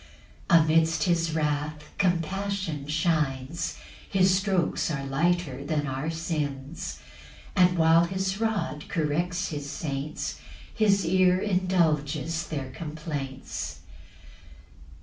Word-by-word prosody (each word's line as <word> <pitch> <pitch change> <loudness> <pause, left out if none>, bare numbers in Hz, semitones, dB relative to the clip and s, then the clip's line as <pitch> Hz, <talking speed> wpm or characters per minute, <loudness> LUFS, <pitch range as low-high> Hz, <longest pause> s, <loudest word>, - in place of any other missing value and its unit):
5 170 -1 +7
Amidst 160 +1 +3
his 165 -2 +1
wrath 150 0 -1 0.2
compassion 185 -3 -1
shines; 155 -2 0 0.3
His 190 -1 +4
strokes 190 -5 +1
are 140 -3 -2
lighter 150 0 0
than 145 0 -1
our 135 +3 -2
sins; 155 -3 -3 0.6
And 180 -2 +5
while 165 +1 +5
his 190 +2 -2
rod 190 -9 -1
corrects 170 +4 0
his 145 -2 -5
saints, 145 0 -4 0.3
His 200 -4 +3
ear 185 +1 +4
indulges 165 -5 +1
their 135 -4 -4
complaints. 150 -3 -5
165 Hz, 100 wpm, -27 LUFS, 150-180 Hz, 0.6 s, 5